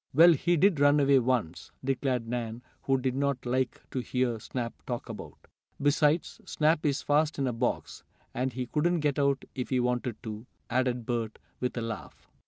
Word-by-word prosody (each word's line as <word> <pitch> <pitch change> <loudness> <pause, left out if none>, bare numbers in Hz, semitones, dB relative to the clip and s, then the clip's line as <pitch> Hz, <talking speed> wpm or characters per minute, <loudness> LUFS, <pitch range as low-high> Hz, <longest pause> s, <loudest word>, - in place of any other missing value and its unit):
"Well, 170 +3 +9
he 175 +4 +1
did 180 -2 +4
run 145 +1 +5
away, 140 -1 +5
once," 115 -10 -1
declared 130 -3 0
Nan, 120 0 -4 0.2
who 135 0 +2
did 130 -1 -1
not 140 -1 -1
like 125 0 -1
to 130 - -2
hear 125 -2 -1
Snap 120 +1 -4
talked 120 -2 -4
about. - - -9 0.4
"Besides, 150 +3 +2
Snoop 155 0 +1
is 140 -1 0
fast 150 +2 +2
in 140 - 0
a 125 - 0
box, 120 +2 -2 0.3
and 130 +2 -1
he 125 +1 -4
wouldn't 170 +2 +2
get 145 -1 +1
out 140 -1 +1
if 125 -2 -4
he 130 - +2
wanted 125 -1 0
to," 110 +1 -7 0.2
added 125 -2 0
Bert, 115 -2 -2 0.2
with 125 0 -2
a - - -1
laugh. 115 -1 -7
130 Hz, 185 wpm, -29 LUFS, 120-145 Hz, 0.4 s, Well